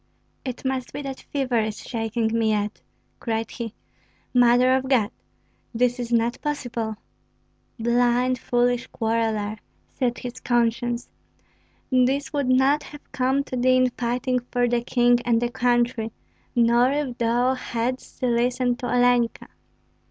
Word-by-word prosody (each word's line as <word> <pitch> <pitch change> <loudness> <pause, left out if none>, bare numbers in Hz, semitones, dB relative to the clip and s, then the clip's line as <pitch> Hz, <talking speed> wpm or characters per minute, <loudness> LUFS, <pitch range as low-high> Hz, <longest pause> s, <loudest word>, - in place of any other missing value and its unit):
It 255 0 -6
must 260 -1 -2
be 290 - -5
that 270 -1 -5
fever 260 -4 0
is 215 -1 -2
shaking 225 -1 -1
me 225 -1 +2
yet," 210 0 -1 0.4
cried 225 -1 -2
he. 230 -2 -6 0.6
"Mother 245 +1 +5
of 265 0 -1
God, 235 -5 +3 0.6
this 245 +1 +1
is 240 -1 -4
not 235 +1 +1
possible!" 245 -7 -3 0.8
"Blind, 245 +2 +2
foolish 245 0 +1
quarreller," 220 -2 -1 0.3
said 245 -2 -1
his 245 0 -7
conscience, 240 0 0 0.8
"this 260 +4 +2
would 285 -3 0
not 265 +3 +4
have 295 0 -13
come 270 +1 +1
to 260 - -6
thee 255 +1 +3
in 255 -1 +3
fighting 250 +1 -1
for 245 -1 +1
the 240 0 +1
king 240 0 +3
and 235 -2 +2
the 240 0 -1
country, 240 -2 +1 0.4
nor 240 +2 +4
if 280 -4 -2
thou 240 +2 +2
hadst 255 0 -4
listened 245 0 +1
to 245 - -3
Olenka." 245 -1 +2
245 Hz, 135 wpm, -24 LUFS, 235-255 Hz, 0.8 s, Mother